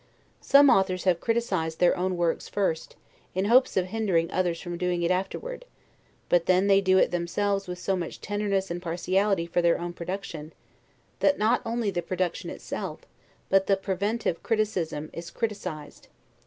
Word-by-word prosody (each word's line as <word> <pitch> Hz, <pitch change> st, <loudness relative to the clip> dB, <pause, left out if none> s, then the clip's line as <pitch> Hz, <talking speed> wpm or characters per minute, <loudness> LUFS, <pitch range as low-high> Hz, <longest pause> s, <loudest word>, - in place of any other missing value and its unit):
Some 280 Hz, -1 st, +6 dB
authors 190 Hz, -1 st, +2 dB
have 180 Hz, -3 st, +2 dB
criticised 190 Hz, -9 st, -1 dB
their 175 Hz, -1 st, +4 dB
own 185 Hz, 0 st, -1 dB
works 170 Hz, -1 st, -1 dB
first, 190 Hz, -6 st, -2 dB, 0.4 s
in 190 Hz, +1 st, +1 dB
hopes 245 Hz, +2 st, +4 dB
of 185 Hz, -, +2 dB
hindering 185 Hz, -5 st, 0 dB
others 175 Hz, -2 st, 0 dB
from 175 Hz, -1 st, -5 dB
doing 175 Hz, 0 st, -1 dB
it 170 Hz, -, +2 dB
afterward: 340 Hz, -, -3 dB, 0.6 s
but 175 Hz, -1 st, +2 dB
then 185 Hz, +1 st, +4 dB
they 200 Hz, 0 st, +5 dB
do 190 Hz, -1 st, +3 dB
it -, -, +3 dB
themselves 195 Hz, +3 st, -1 dB
with 180 Hz, 0 st, -5 dB
so 190 Hz, +2 st, -1 dB
much 175 Hz, -3 st, -5 dB
tenderness 200 Hz, -2 st, -1 dB
and 175 Hz, +1 st, -4 dB
partiality 185 Hz, +2 st, 0 dB
for 170 Hz, +1 st, 0 dB
their 170 Hz, 0 st, +3 dB
own 175 Hz, 0 st, -4 dB
production, 170 Hz, -3 st, -6 dB, 0.7 s
that 285 Hz, -, +3 dB
not 220 Hz, +4 st, +2 dB
only 230 Hz, -2 st, -1 dB
the 175 Hz, -2 st, -2 dB
production 180 Hz, +1 st, -2 dB
itself, -, -, -6 dB, 0.5 s
but 195 Hz, 0 st, +3 dB
the 195 Hz, -, +3 dB
preventive 195 Hz, 0 st, -2 dB
criticism 190 Hz, -9 st, -1 dB
is 170 Hz, 0 st, -7 dB
criticised. 185 Hz, -10 st, -5 dB
185 Hz, 165 wpm, -27 LUFS, 175-205 Hz, 0.7 s, Some